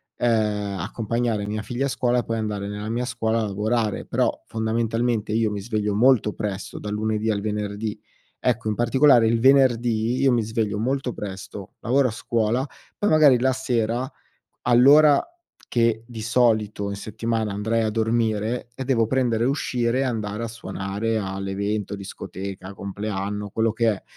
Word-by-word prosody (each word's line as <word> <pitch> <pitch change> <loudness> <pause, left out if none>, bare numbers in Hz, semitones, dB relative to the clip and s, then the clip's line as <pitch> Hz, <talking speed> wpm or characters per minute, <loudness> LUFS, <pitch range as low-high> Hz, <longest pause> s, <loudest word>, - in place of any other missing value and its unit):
ehm, 105 -4 0
accompagnare 115 +2 -2
mia 110 +1 -3
figlia 125 +5 -2
a - - -3
scuola 125 -1 +1
e - - -2
poi 115 0 -2
andare 105 -2 -3
nella 105 +1 -5
mia 120 +2 -1
scuola 115 -2 -1
a - - 0
lavorare, 105 +2 -1
però - - +1 0.2
fondamentalmente, 115 0 -1
io 110 -1 +1
mi 100 - -3
sveglio 105 -1 -1
molto 115 -1 +4
presto 100 -2 -5
dal 105 0 -5
lunedì 110 +1 -1
al 100 -2 0
venerdì. 105 0 -3 0.4
Ecco, 120 -3 0
in 105 - -1
particolare 120 0 +5
il 115 0 +1
venerdì 120 -3 +3
io 135 -1 +4
mi 120 -2 +2
sveglio 110 -2 -1
molto 130 +2 -1
presto, 95 -1 -8
lavoro 130 +4 +3
a - - -2
scuola, 115 +3 0 0.3
poi 205 - +1
magari 150 -5 +6
la 130 +2 +2
sera, 120 0 -1 0.5
all'ora 140 +5 +6 0.5
che 115 -1 +1
di 115 -3 -8
solito 110 -3 +1
in 100 - -3
settimana 110 +1 -2
andrei 110 +3 0
a 110 - 0
dormire, 115 +1 0
eh, 135 - -4
devo 120 -4 +2
prendere 120 -4 +1
e 125 - +2
uscire 125 -3 0
e - - +1
andare 110 -3 -2
a - - -2
suonare 105 +1 -3
all'evento, 100 +1 -3
discoteca, 95 0 -7
compleanno, 100 +1 -4
quello 110 +2 +1
che 115 0 +2
è, 100 - -4
110 Hz, 165 wpm, -23 LUFS, 105-120 Hz, 0.5 s, magari